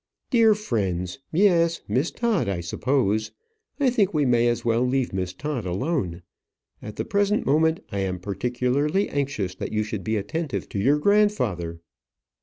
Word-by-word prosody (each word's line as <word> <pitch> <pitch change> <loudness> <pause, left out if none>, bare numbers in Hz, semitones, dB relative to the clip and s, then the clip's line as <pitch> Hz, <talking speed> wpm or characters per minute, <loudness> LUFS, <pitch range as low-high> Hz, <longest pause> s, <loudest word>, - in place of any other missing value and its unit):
"Dear 225 -3 +5
friends! 95 - -2
Yes; 170 -2 +3
Miss 140 +7 +1
Todd, 215 - 0
I 95 -3 -1
suppose. 110 +4 0 0.5
I 270 -3 +3
think 205 -7 +1
we 150 -2 +3
may 120 -2 +3
as 120 0 -1
well 115 0 +2
leave 125 -1 0
Miss 95 -2 -2
Todd 140 +5 -4
alone. 95 - -2 0.6
At 105 - -8
the - - -3
present 205 -1 +1
moment, 160 +5 +2
I 100 - -2
am 95 -1 -1
particularly 125 - 0
anxious 135 -10 -2
that 95 - -6
you 110 0 0
should 105 -3 -5
be 110 +3 -1
attentive 135 +9 -3
to 100 - -3
your 135 +9 +3
grandfather." 125 - +1
125 Hz, 160 wpm, -24 LUFS, 100-165 Hz, 0.6 s, Dear